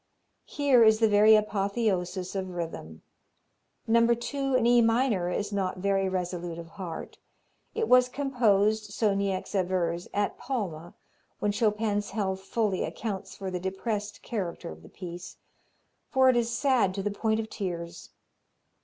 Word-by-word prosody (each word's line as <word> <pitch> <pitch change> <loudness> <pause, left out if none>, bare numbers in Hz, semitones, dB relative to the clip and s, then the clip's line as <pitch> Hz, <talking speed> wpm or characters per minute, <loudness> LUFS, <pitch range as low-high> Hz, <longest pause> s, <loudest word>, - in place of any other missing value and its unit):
Here 275 -5 +4
is 220 -1 +6
the 225 - +5
very 210 +1 +6
apotheosis 200 -3 -1
of 190 -1 -3
rhythm. 165 - -6 0.8
No. 230 +1 +4
2, 270 +2 -2
in 250 -2 +3
E 240 0 +5
minor, 225 -6 +2
is 205 +3 -2
not 190 -2 -1
very 195 0 +1
resolute 175 -2 -3
of 165 -1 -9
heart. 170 -2 -7 0.6
It 450 -1 0
was 250 0 +5
composed, 220 -6 +1
so 210 -2 +2
Niecks 195 -1 -2
avers, 180 -3 -1
at 205 0 -1
Palma, 180 - -4 0.4
when 210 - 0
Chopin's 210 -1 0
health 190 -2 -2
fully 200 -1 -1
accounts 205 -4 -5
for 190 -1 -5
the 180 - -3
depressed 205 +3 -4
character 190 - -4
of 80 0 -11
the - - -14
piece, 175 -1 -9 0.7
for 260 -1 +4
it 255 - +4
is 235 -1 +1
sad 235 -6 +2
to 195 - -3
the 205 - -1
point 220 +2 0
of 220 - -3
tears. 175 -5 -6
205 Hz, 150 wpm, -28 LUFS, 185-225 Hz, 0.8 s, is